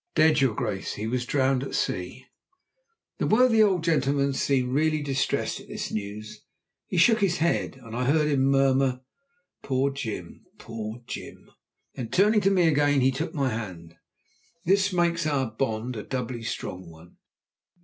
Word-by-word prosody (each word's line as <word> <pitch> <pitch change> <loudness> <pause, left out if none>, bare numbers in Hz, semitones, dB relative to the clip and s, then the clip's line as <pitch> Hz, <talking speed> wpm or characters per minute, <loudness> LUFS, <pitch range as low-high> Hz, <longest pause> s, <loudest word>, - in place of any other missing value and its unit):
"Dead, 155 -2 +4
your 130 -6 +2
Grace! 105 -5 -3
He 105 - -5
was 125 +2 -2
drowned 135 -2 +1
at 135 - -5
sea." 90 +8 -3 0.9
The - - 0
worthy 225 0 +4
old 190 -5 +3
gentleman 140 -3 +1
seemed 130 -2 0
really 155 +1 +1
distressed 135 -2 -1
at - - -14
this - - -5
news. 105 +1 -6 0.5
He - - -3
shook 220 +7 +5
his 185 -3 +2
head, 170 -3 0
and 115 -3 -10
I 125 +1 -1
heard 150 +3 +3
him 140 -3 +2
murmur: 135 -1 +2 0.6
"Poor 135 +1 0
Jim! 110 -10 -6
Poor 115 0 -7
Jim!" - - -9 0.4
Then, 115 -3 -6
turning 210 - +3
to 195 - +3
me 180 -4 +3
again, 145 -2 +3
he 130 +1 +4
took 150 +6 -4
my 135 -3 +1
hand. 90 -8 -6 0.7
"This 195 +3 +3
makes 170 -2 +1
our 135 -6 0
bond 115 +1 -2
a 105 - -4
doubly 125 0 -4
strong 95 -5 -5
one. 80 +2 -16
135 Hz, 160 wpm, -26 LUFS, 115-155 Hz, 0.9 s, shook